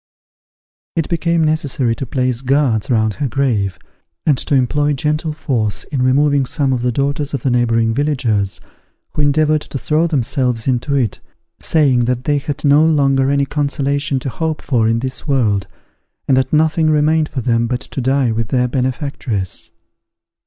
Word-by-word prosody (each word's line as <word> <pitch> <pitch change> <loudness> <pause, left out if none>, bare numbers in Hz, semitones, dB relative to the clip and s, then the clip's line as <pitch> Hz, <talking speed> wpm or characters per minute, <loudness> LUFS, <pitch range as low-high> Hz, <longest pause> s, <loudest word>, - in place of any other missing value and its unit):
It 165 -3 0
became 170 -1 +1
necessary 145 -6 0
to 135 - -5
place 125 -1 -1
guards 135 -5 +1
round 110 -3 +2
her 145 +6 -2
grave, 110 - 0 0.5
and 150 - +4
to 145 - 0
employ 145 +3 +1
gentle 150 +3 -1
force 120 -9 -2
in 140 -3 -3
removing 140 +1 +2
some 135 -1 0
of 125 - -1
the 125 0 0
daughters 140 +3 -1
of 130 - -5
the 130 - +1
neighbouring 115 -2 +2
villagers, 120 -8 0 0.5
who - - -2
endeavoured 155 +1 +2
to 140 - -6
throw 155 +6 +1
themselves 125 -5 -1
into 130 +2 0
it, 120 -7 0 0.4
saying 145 -6 +3
that 125 0 -1
they 145 +1 +1
had 145 +1 -5
no 145 +2 +5
longer 135 -4 +3
any 140 0 +2
consolation 140 -1 -1
to 135 - -3
hope 160 +3 -3
for 115 -5 +1
in 115 +1 +1
this 130 +3 -5
world, 110 -9 +1 0.6
and 135 - +4
that 130 0 +1
nothing 155 +1 +2
remained 155 +1 +2
for 130 - -4
them 115 -1 +1
but 125 +1 -2
to 135 - -5
die 130 -1 +1
with 110 -1 -2
their 125 +1 +1
benefactress. 125 - -3
135 Hz, 165 wpm, -17 LUFS, 120-150 Hz, 0.6 s, no